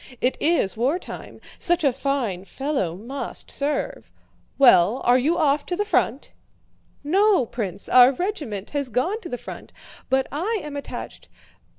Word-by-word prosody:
It 250 - +1
is 315 - +2
wartime. 270 +11 -3 0.2
Such 345 -1 +2
a 275 -3 +3
fine 250 -9 -2
fellow 265 - -2
must 240 +9 -5
serve. 285 0 -2 0.5
Well, 240 -4 +6
are 245 +1 +4
you 310 +7 +1
off 290 -2 +2
to 355 - -1
the 415 +3 -1
front?" 420 - 0 0.7
"No, 380 - +3
Prince, 200 -5 -4
our 250 +1 +7
regiment 275 - -4
has 280 -3 -2
gone 345 - -1
to 345 - -8
the 245 - -3
front, - - -10 0.4
but 265 0 +2
I 400 +10 -1
am 300 -1 -7
attached... 285 - -7
275 Hz, 150 wpm, -23 LUFS, 245-330 Hz, 0.7 s, our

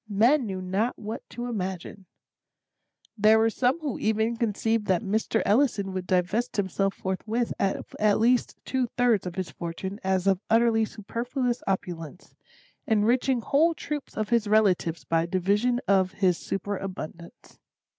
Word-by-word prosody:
Men 235 +6 +3
knew 190 -2 -4
not 195 +6 -1
what 215 +2 -6
to 240 +1 -6
imagine. 190 -4 -5 1.1
There 215 0 +5
were 225 +1 +3
some 255 +7 +1
who 285 -6 -3
even 220 +2 +1
conceived 225 -1 0
that 185 -2 +2
Mr. 210 +3 0
Ellison 205 -4 +2
would 185 -1 -4
divest 190 +7 0
himself 195 0 0
forthwith 220 +5 -2
of 195 -1 -2
at 210 -1 +3
least 240 +2 +2
two 260 -2 0
thirds 235 -6 +3
of 175 - -6
his 185 -5 -4
fortune 180 +5 -6
as 190 -1 0
of 195 -1 +2
utterly 225 -1 +4
superfluous 240 +4 -3
opulence; 175 -3 -4 0.5
enriching 235 +4 +2
whole 320 +7 +2
troops 295 -2 -6
of 215 -1 -1
his 235 -3 +2
relatives 185 -7 +2
by 165 +3 0
division 200 +7 +1
of 190 -1 +3
his 185 -2 +2
superabundance. 195 -1 -6
210 Hz, 145 wpm, -26 LUFS, 190-235 Hz, 1.1 s, There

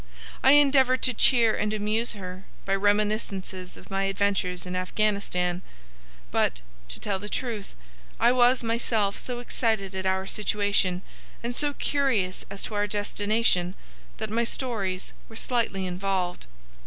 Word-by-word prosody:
I 265 - +7
endeavored 270 -3 +4
to 255 - +4
cheer 230 -1 +5
and 210 0 -1
amuse 215 +3 0
her 185 -2 -8 0.2
by 195 - 0
reminiscences 200 -2 -1
of - - -15
my 195 0 0
adventures 195 -2 0
in 180 0 -4
Afghanistan; 185 -2 0 0.7
but, - - +1 0.3
to - - -7
tell 200 -2 -2
the 210 +2 -6
truth, 225 -5 -4 0.4
I 240 - +5
was 250 0 +4
myself 225 -3 +1
so 250 -1 -3
excited 220 -5 0
at 190 0 -2
our 190 0 0
situation 200 -3 +1 0.4
and 240 +1 -2
so 290 0 +1
curious 230 -11 0
as 200 - -6
to - - -5
our 205 0 +1
destination 205 -3 +1 0.4
that 220 -1 -4
my 230 +2 +1
stories 205 -7 -2 0.2
were 225 - -12
slightly 225 -6 -1
involved. 185 - -2
205 Hz, 140 wpm, -26 LUFS, 190-230 Hz, 0.7 s, I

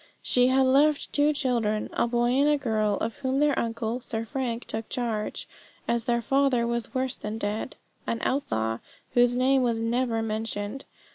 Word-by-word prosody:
She 250 0 +4
had 265 +1 +4
left 285 +3 +3
two 290 +1 +4
children, 235 -7 0
a - - +1
boy 240 0 +1
and 280 +3 +3
a 295 - +3
girl, 215 -6 0
of 230 - -3
whom 265 -1 -1
their 295 -1 +3
uncle, 230 +1 -2
Sir 230 -2 -4
Frank, 240 -1 -3
took 220 0 -5
charge, 230 -4 -3 0.4
as 235 -1 0
their 235 -1 +1
father 270 -2 +2
was 235 +1 -3
worse 260 0 0
than 210 +1 -5
dead 210 0 -3 0.3
an 230 - 0
outlaw 115 - -1 0.3
whose 245 0 +4
name 260 +1 +3
was 235 -2 +1
never 230 0 0
mentioned. 215 +2 -3
240 Hz, 170 wpm, -26 LUFS, 225-260 Hz, 0.4 s, She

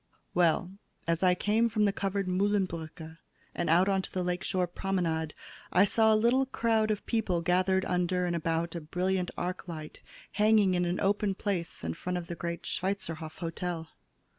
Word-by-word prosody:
"Well, 175 +1 +2 0.4
as 165 0 +1
I 180 -1 +4
came 220 +5 +2
from 215 -1 +2
the 200 - +2
covered 195 0 -1
Mühlenbrücke 175 -4 -1 0.3
and 170 -2 -2
out 175 +4 +5
on 195 -1 +2
to - - -8
the 185 - -1
lake 180 +1 -2
shore 185 -2 +1
promenade, 170 -4 -2 0.4
I 185 +3 +6
saw 220 +2 +4
a - - +5
little 240 +5 +3
crowd 225 -3 +1
of 210 -2 -1
people 205 -7 0
gathered 185 +2 +2
under 180 0 +1
and 175 -1 0
about 165 0 -1
a 170 - -4
brilliant 180 +3 -1
arclight 175 -3 -5 0.3
hanging 210 -2 +4
in 180 0 +1
an 175 +1 -1
open 200 0 +1
place 185 -5 -3
in 80 0 -2
front 180 - -3
of 175 - -4
the 170 - -6
great 170 0 -4
Schweizerhof 175 -5 -3
Hotel. 165 -1 -4
180 Hz, 175 wpm, -30 LUFS, 170-200 Hz, 0.4 s, I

